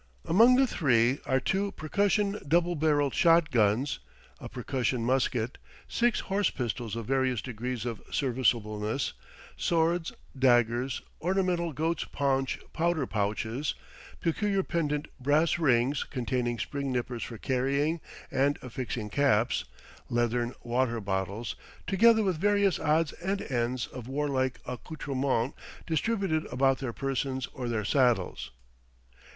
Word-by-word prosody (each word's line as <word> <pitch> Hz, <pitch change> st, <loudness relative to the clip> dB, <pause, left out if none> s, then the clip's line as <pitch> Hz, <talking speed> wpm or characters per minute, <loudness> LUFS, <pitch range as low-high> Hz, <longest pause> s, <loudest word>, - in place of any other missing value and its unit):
Among 230 Hz, +8 st, +6 dB
the 265 Hz, +1 st, +5 dB
three 130 Hz, -, +2 dB
are 130 Hz, -1 st, +3 dB
two 195 Hz, +8 st, -1 dB
percussion 200 Hz, +5 st, +1 dB
double 175 Hz, +3 st, +3 dB
barrelled 145 Hz, -3 st, +2 dB
shot 165 Hz, -2 st, +4 dB
guns, 115 Hz, -, +2 dB, 0.4 s
a -, -, -8 dB
percussion 125 Hz, -1 st, -1 dB
musket, 125 Hz, -2 st, 0 dB, 0.3 s
six 240 Hz, -1 st, +1 dB
horse 195 Hz, -1 st, +1 dB
pistols 115 Hz, -2 st, -3 dB
of 115 Hz, -1 st, -4 dB
various 130 Hz, -2 st, +1 dB
degrees 120 Hz, 0 st, -4 dB
of 115 Hz, -3 st, -4 dB
serviceableness, 115 Hz, -2 st, 0 dB, 0.4 s
swords, 170 Hz, 0 st, +1 dB, 0.2 s
daggers, 120 Hz, -1 st, +2 dB, 0.2 s
ornamental 180 Hz, -1 st, +1 dB
goat's 160 Hz, +3 st, -1 dB
paunch 135 Hz, -2 st, 0 dB, 0.2 s
powder 165 Hz, -3 st, +1 dB
pouches, 110 Hz, +6 st, -2 dB, 0.4 s
peculiar 195 Hz, +3 st, 0 dB
pendent 150 Hz, -4 st, -1 dB
brass 150 Hz, +6 st, +2 dB
rings 135 Hz, -2 st, +2 dB
containing 125 Hz, -1 st, -2 dB
spring 140 Hz, +4 st, -3 dB
nippers 120 Hz, -1 st, -2 dB
for 115 Hz, -, -5 dB
carrying 140 Hz, +7 st, 0 dB, 0.3 s
and 140 Hz, +2 st, +2 dB
affixing 120 Hz, -3 st, -4 dB
caps, 120 Hz, -4 st, +2 dB, 0.4 s
leathern 120 Hz, +1 st, 0 dB
water 120 Hz, -1 st, 0 dB
bottles, 100 Hz, +2 st, -3 dB, 0.3 s
together 220 Hz, +3 st, +5 dB
with 185 Hz, -5 st, 0 dB
various 200 Hz, -2 st, +3 dB
odds 155 Hz, 0 st, +2 dB
and 195 Hz, +3 st, -3 dB
ends 120 Hz, 0 st, 0 dB
of 125 Hz, -2 st, -9 dB
warlike 135 Hz, -2 st, -1 dB
accoutrements 135 Hz, -1 st, -2 dB, 0.3 s
distributed 170 Hz, -1 st, 0 dB
about 135 Hz, +1 st, +2 dB
their 130 Hz, -3 st, -3 dB
persons 135 Hz, 0 st, -2 dB
or 125 Hz, -2 st, -4 dB
their 110 Hz, -3 st, -1 dB
saddles. 115 Hz, -, +1 dB
135 Hz, 120 wpm, -29 LUFS, 120-165 Hz, 0.4 s, Among